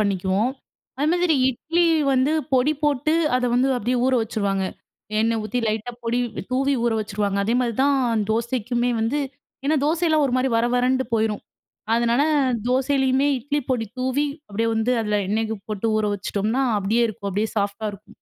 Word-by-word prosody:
பண்ணிக்குவோம். 195 +2 +1 0.5
அது 295 - +1
மாதிரி 350 -3 +2
இட்லி 330 +7 0 0.3
வந்து 265 +3 +2 0.2
பொடி 260 +4 +3
போட்டு 295 +1 +1 0.2
அத 255 - -1
வந்து 255 +2 +3
அப்படியே 245 +2 -1
ஊற 260 - +2
வச்சுருவாங்க. 200 -4 -1 0.6
எண்ணெய் 225 0 +1
ஊத்தி 220 +4 -2
லைட்டா 220 +3 -2
பொடி 235 +1 0 0.3
தூவி 275 +2 +2
ஊற 235 - +2
வச்சுருவாங்க. 205 -1 -2
அதே 230 +4 +1
மாதிரி 235 -3 -1
தான் 255 -6 +2
தோசைக்குமே 240 +1 0
வந்து 230 +7 0 0.5
ஏன்னா 305 +2 +2
தோசையெல்லாம் 315 -1 +2
ஒரு 250 - -3
மாரி 260 +1 +1
வர 230 - +2
வரண்டு 255 +1 +2
போயிரும். 220 -1 0 0.5
அதனால 235 +3 +2 0.5
தோசையிலேயுமே 265 +1 +2
இட்லி 285 +4 -2
பொடி 230 -3 0
தூவி 260 +3 0 0.2
அப்படியே 225 +3 -1
வந்து 225 +3 0
அதுல 210 -1 0
எண்ணெய்க்கு 220 +1 -1
போட்டு 215 +1 -2
ஊற 215 - +1
வச்சுட்டோம்ன்னா, 210 +6 -1 0.2
அப்படியே 215 +4 +1
இருக்கும். 200 -2 -5
அப்படியே 210 +3 -1
சாஃப்ட்டா 205 +2 -2
இருக்கும். 200 +1 -14
235 Hz, 160 wpm, -23 LUFS, 215-265 Hz, 0.6 s, பொடி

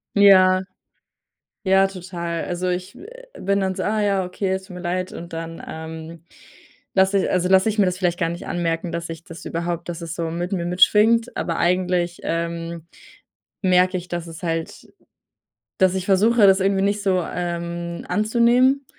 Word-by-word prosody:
Ja. 185 -2 +6 1.0
Ja, 190 0 +4
total. 175 -3 -5
Also, 180 0 -3
ich 180 +2 -3
we 385 - -12 0.3
bin 200 +1 +1
dann 190 -1 -1
so: 190 - -4
„Ah 215 +1 0
ja. 200 -2 +1
okay. 185 +2 -3
Es 190 0 -3
tut 185 - -12
mir 180 - -7
leid.“ 185 +1 -2
Und 170 0 -9
dann, 165 0 -6
ähm, 160 +1 -8 0.7
lasse 190 +1 +4
ich - - 0
also, 180 0 +1
lasse 190 +3 +4
ich 215 0 -2
mir 195 - +5
das 180 0 -1
vielleicht 175 -2 0
gar 165 -3 +1
nicht 170 +1 -6
anmerken, 170 0 -2
dass 170 0 -4
ich 165 0 -8
das 165 -1 -11
überhaupt 170 0 -3
dass 175 -1 -5
es 165 -1 -6
so 165 -2 -3
mit 175 +3 -4
mir 170 -2 -1
mitschwingt. 215 +6 +4
Aber 165 - -2
eigentlich, 180 -1 0
ähm, 170 0 -3 0.8
merke 185 0 +3
ich 180 - -7
dass 175 -1 -4
es 165 +1 -10
halt 165 -1 -4 0.9
dass 190 0 +3
ich 190 -1 -2
versuche, 210 +3 +4
das 195 0 +5
irgendwie 195 0 +1
nicht 205 +1 0
so, 185 -3 +1
ähm, 170 0 -4
anzunehmen? 240 +5 +3
180 Hz, 180 wpm, -22 LUFS, 170-195 Hz, 1.0 s, Ja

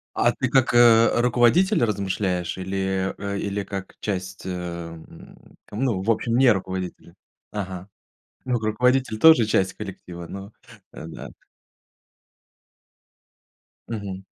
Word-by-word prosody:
А 120 - +3
ты 130 - -2
как, 125 -1 +2
э, 115 -1 +6
руководитель 120 +6 +3
размышляешь 95 -4 -2
или 95 0 -2
э, 100 0 -4
или 100 0 -2
как 95 0 -7
часть, 95 -2 -4
эм, 85 -3 -6 0.6
ну, 110 -4 -1
в 115 - 0
общем, 115 +1 +1
не 130 0 +6
руководителя? 95 -2 -5 0.4
Ага. 95 -2 -5 0.6
Ну, 125 -2 0
руководитель 115 +2 +1
тоже 160 -5 +7
часть 95 -3 +1
коллектива, 90 -4 -8
но, 100 +4 -9 0.4
э, - - -9
да. - - -9 2.6
Мгм. 100 -4 -5
100 Hz, 115 wpm, -23 LUFS, 95-120 Hz, 2.6 s, тоже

